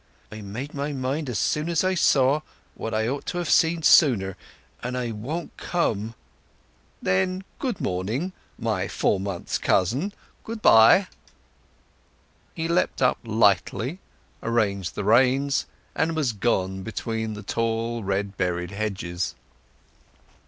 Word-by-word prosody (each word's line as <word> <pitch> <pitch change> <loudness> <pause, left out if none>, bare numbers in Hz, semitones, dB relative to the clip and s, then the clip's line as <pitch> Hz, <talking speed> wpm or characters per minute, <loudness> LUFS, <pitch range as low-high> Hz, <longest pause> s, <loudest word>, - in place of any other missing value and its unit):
I 110 0 -8
made 115 +9 -6
up - - -13
my 145 +1 -2
mind 135 +2 -2
as 120 - -2
soon 150 +9 0
as 170 0 +1
I 185 0 +2
saw—what 140 -7 0
I 110 0 0
ought 140 +3 -3
to 175 - -3
have 175 -3 -1
seen 165 -1 +3
sooner; 105 - +5 0.5
and 125 +1 -3
I 120 -2 -2
won't 140 +11 -5
come." 115 - -1 0.9
"Then 185 - +1 0.2
good 250 -8 -2
morning, 110 - -2 0.2
my - - -1
four 95 - +1
months' 95 -2 -3
cousin—good 190 - -1
bye!" 115 - +7 1.5
He 165 -2 -2
leapt 170 -5 +1
up 125 - +3
lightly, 110 - +1 0.4
arranged 100 -6 0
the - - -3
reins, 130 +6 +3 0.3
and 165 +1 0
was 140 -7 0
gone 95 -3 0
between 110 +1 -3
the 105 - -8
tall 115 +2 -1
red 100 +1 -2
berried 90 -1 -1
hedges. 90 -6 -3
115 Hz, 130 wpm, -25 LUFS, 100-150 Hz, 1.5 s, bye